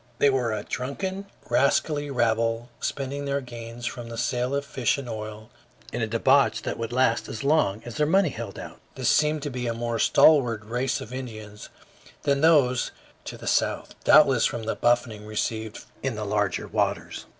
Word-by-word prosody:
They 140 - +4
were 125 -4 0
a 105 -1 -3
drunken, 190 +10 -4 0.2
rascally 145 +4 +1
rabble, 115 -1 0
spending 140 +1 -3
their 140 0 0
gains 120 -2 -8
from 120 -1 -5
the 115 - -7
sale 125 +2 0
of 140 0 -2
fish 130 -2 0
and 140 -2 -6
oil 110 0 -7 0.4
in 120 - -2
a 115 - 0
debauch 130 +5 +3
that - - -4
would 115 0 -3
last 120 -2 +1
as 110 - -5
long 140 -8 +2
as 120 - -7
their 150 - +2
money 190 +1 +4
held 115 -5 -7
out. - - -9 0.2
This - - 0
seemed 150 -1 +2
to 145 - -3
be 125 -1 -3
a 115 - -1
more 115 0 -2
stalwart 120 -8 +4
race 125 +4 -1
of 115 - -9
Indians 110 -5 -8 0.5
than 140 -1 +1
those 140 -6 +4 0.4
to - - -7
the - - -11
south, - - 0
doubtless - - +6
from 115 - -5
the 110 - -1
buffeting 120 -3 +1
received 110 0 -3 0.2
in 135 -4 -2
the 105 0 -4
larger 105 -1 -1
waters. - - -2
120 Hz, 185 wpm, -25 LUFS, 115-140 Hz, 0.5 s, doubtless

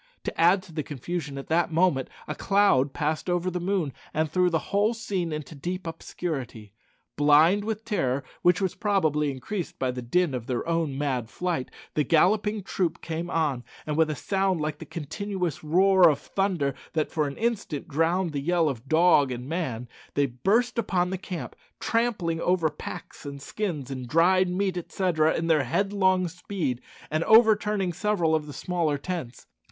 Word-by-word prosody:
To - - -3
add 180 +3 +5
to 170 - -14
the 155 - -1
confusion 150 +1 -5
at 135 - -6
that 170 +1 +2
moment, 160 -6 +2 0.2
a 150 - -2
cloud 175 -7 +3
passed 155 +4 -2
over 175 +1 0
the 180 - -2
moon 175 -6 -1 0.2
and 155 -1 0
threw 180 +1 +3
the 165 +2 -3
whole 210 +3 +3
scene 190 -7 -2
into 150 +1 -5
deep 180 +5 -5
obscurity. 135 - -5 0.4
Blind 155 +7 +5
with 220 +1 -4
terror, 140 - 0 0.2
which 175 0 +4
was 190 -2 0
probably 155 -9 +1
increased 155 +8 -5
by 130 -1 0
the 125 0 -5
din 155 +6 +1
of 120 -3 -4
their 125 +2 -2
own 165 -5 0
mad 130 -5 -1
flight, 175 -5 -2 0.2
the 150 - +2
galloping 205 +7 +2
troop 175 -3 -1
came 165 +1 -4
on, 150 -8 0 0.2
and 150 - -2
with 160 0 +3
a 155 - -1
sound 190 +4 0
like 150 -1 -3
the - - -9
continuous 180 +2 -4
roar 185 +3 +5
of 145 - +1
thunder 180 -8 -1 0.2
that 155 -2 0
for 155 -2 0
an 140 - -6
instant 220 -10 -2
drowned 165 +4 +1
the 145 -2 -3
yell 170 +2 +2
of 130 -1 -6
dog 160 -4 +5
and 125 +1 -5
man 135 -8 -3 0.3
they 145 - +3
burst 210 - +1
upon 180 -5 0
the 190 - -1
camp, 180 -3 -6 0.2
trampling 210 -9 0
over 175 -4 +2
packs 150 - -8
and 140 -1 -7
skins, 150 -4 -4
and 130 -2 -5
dried 180 +5 +4
meat, 185 0 -1
etc., 170 -3 +1
in 165 - -1
their 160 -4 +3
headlong 190 +5 +1
speed, 165 -7 -3 0.3
and 155 +2 +1
overturning 210 -4 +4
several 185 -4 +1
of 155 -1 0
the 145 - -8
smaller 165 -4 -1
tents. 140 -6 -5
165 Hz, 180 wpm, -26 LUFS, 145-190 Hz, 0.4 s, add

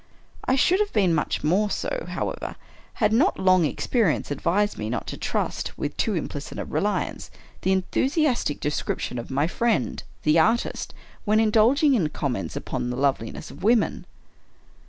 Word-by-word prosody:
I 260 - +3
should 360 +8 +3
have 420 -1 +1
been 190 -5 +3
much 150 - -1
more 190 +7 +2
so, - - -3
however, - - -4 0.4
had 215 -1 +2
not 290 - +3
long 185 -2 +4
experience 190 - 0
advised 190 +8 +1
me 110 0 -3
not 120 - -2
to - - -5
trust, - - -3
with - - -3
too - - 0
implicit - - -5
a - - -3
reliance, - - -2 0.3
the 190 - +1
enthusiastic 250 - +1
descrip 150 0 -1
tions 125 - -4
of 115 - -7
my 140 +2 +1
friend, 230 +6 0 0.2
the 155 +2 +4
artist, 225 +8 +1 0.3
when 215 0 +3
indulging 230 +7 +4
in 180 -11 +2
comments 125 -9 -3
upon 120 - -3
the 125 - -3
loveliness 135 -1 -1
of - - -12
woman. 225 +1 +2
200 Hz, 160 wpm, -25 LUFS, 150-235 Hz, 0.4 s, long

